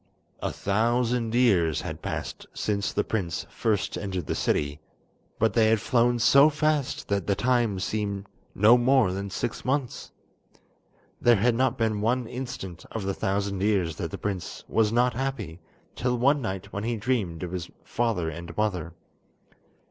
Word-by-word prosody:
A - - -1
thousand 115 +2 0
years 90 - +3
had - - -6
passed - - -5
since 100 -1 -1
the - - 0
prince 90 -6 -2
first 105 -4 -1
entered 95 -4 -3
the - - -2
city, 75 0 0 0.6
but 110 -1 +2
they 110 -2 +4
had 110 -1 +3
flown 120 +2 +2
so 140 +5 +6
fast 150 -2 0
that 100 -3 0
the 100 - +2
time 120 -4 +1
seemed 100 0 -2 0.3
no 110 +5 +6
more 125 -5 +4
than 100 +1 -4
six 115 +4 -3
months. 130 -1 -2 1.1
There 120 0 +6
had 115 +4 +3
not 130 +3 +1
been 110 -2 0
one 120 +3 +1
instant 105 -10 -6
of 110 - -4
the 95 0 -1
thousand 100 0 -1
years 95 -6 +1
that - - -3
the - - -6
prince 100 -4 -4
was 110 -1 +2
not 125 +2 +3
happy 115 -10 -4 0.4
till 125 0 0
one 140 +4 +3
night 95 -3 -5
when 100 -1 -3
he 115 0 -1
dreamed 105 -8 -1
of 90 - -4
his 90 -1 -4
father 115 -8 -1
and 85 +1 -7
mother. 90 -5 -1
110 Hz, 165 wpm, -26 LUFS, 95-120 Hz, 1.1 s, so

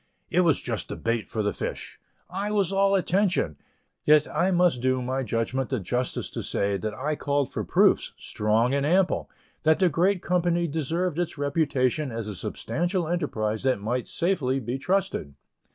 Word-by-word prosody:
It 180 - +4
was 165 -5 +2
just 115 -3 -3
the - - -4
bait 115 -1 -2
for 110 - -2
the 105 - 0
fish; - - -5 0.3
I 195 +3 -3
was 200 -3 +1
all 195 0 +3
attention; 185 - +1 0.5
yet 150 0 +5
I 170 +5 +3
must 175 -8 +3
do 130 0 +2
my 130 +2 -2
judgment 120 +2 -1
the 130 - -1
justice 125 +7 -2
to - - -4
say 100 0 0
that 105 +3 -3
I 150 +6 -2
called 140 -2 0
for - - -2
proofs, - - +3
strong 110 +4 +1
and 140 0 +1
ample, 180 +5 +2 0.3
that 155 0 +4
the 185 -2 +4
great 180 +4 +1
company 175 -1 +1
deserved 160 +3 -1
its 175 -3 -2
reputation 145 -1 0
as 115 -2 -4
a 105 - -4
substantial 175 - -2
enterprise 110 -11 -1
that 130 -5 +1
might 120 +4 -2
safely 145 -8 0
be 125 +2 -4
trusted. 180 - -1
145 Hz, 175 wpm, -26 LUFS, 120-175 Hz, 0.5 s, yet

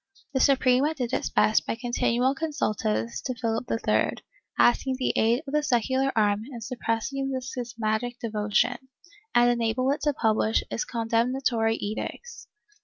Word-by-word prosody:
The 265 - +1
Suprema 270 +3 +3
did 255 -3 -3
its - - 0
best 215 - +2
by - - -1
continual 245 +1 +1
consultas 175 - -2
to 255 - -3
Philip 230 0 -2
III, 225 - +1 0.4
asking 260 +2 +3
the 255 - 0
aid 235 +6 +2
of 275 - -7
the 300 - +3
secular 260 0 +1
arm 210 -2 +2
in 240 - -7
suppressing 250 +3 -2
this 260 -1 -4
schismatic 240 -1 -3
devotion, 225 +3 -1 0.5
and 240 0 +5
enable 240 +2 +1
it 285 - -2
to 295 -1 +1
publish 220 -3 +1
its - - -2
condemnatory 230 0 0
edicts. 225 - -6
240 Hz, 145 wpm, -26 LUFS, 225-265 Hz, 0.5 s, and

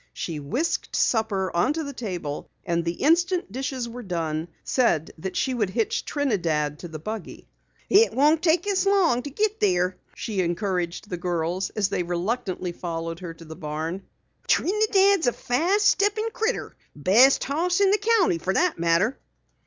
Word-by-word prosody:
She 160 -3 -4
whisked 240 - -2
supper 205 -6 +1
onto 295 - +1
the 280 -1 -6
table 180 - -5 0.2
and 170 -1 0
the 170 0 -1
instant 345 - +2
dishes 260 0 -3
were 240 +1 -8
done, 165 -5 -3 0.2
said 175 - +1
that 190 +3 -4
she 265 - 0
would 215 -6 0
hitch 445 - -1
Trinidad 165 - -1
to 175 - -7
the 160 -1 -7
buggy. 215 +6 -7 0.4
"It 430 +4 +5
won't 300 +4 +3
take 345 +1 +2
us 395 -1 +1
long 360 -11 +3
to 285 - -6
git 420 +8 -1
there," 180 -2 +1 0.2
she 205 -4 -2
encouraged 180 +1 -2
the 180 - -2
girls 175 +1 -2
as 200 -2 +1
they 200 - -1
reluctantly 180 +1 -2
followed 165 -1 -5
her 170 -3 -7
to 165 0 -13
the 160 0 -9
barn. 155 +5 -4 0.5
"Trinidad's 395 -3 +3
a 245 - +3
fast 365 +12 +2
steppin' 415 +2 +1
critter. 450 +3 -2 0.2
Best 220 - +5
horse 345 +6 0
in 395 -1 +4
the 415 - +3
county 420 - +2
fer 190 +3 -1
that 360 - +1
matter." 170 +9 +2
215 Hz, 165 wpm, -25 LUFS, -, 0.5 s, It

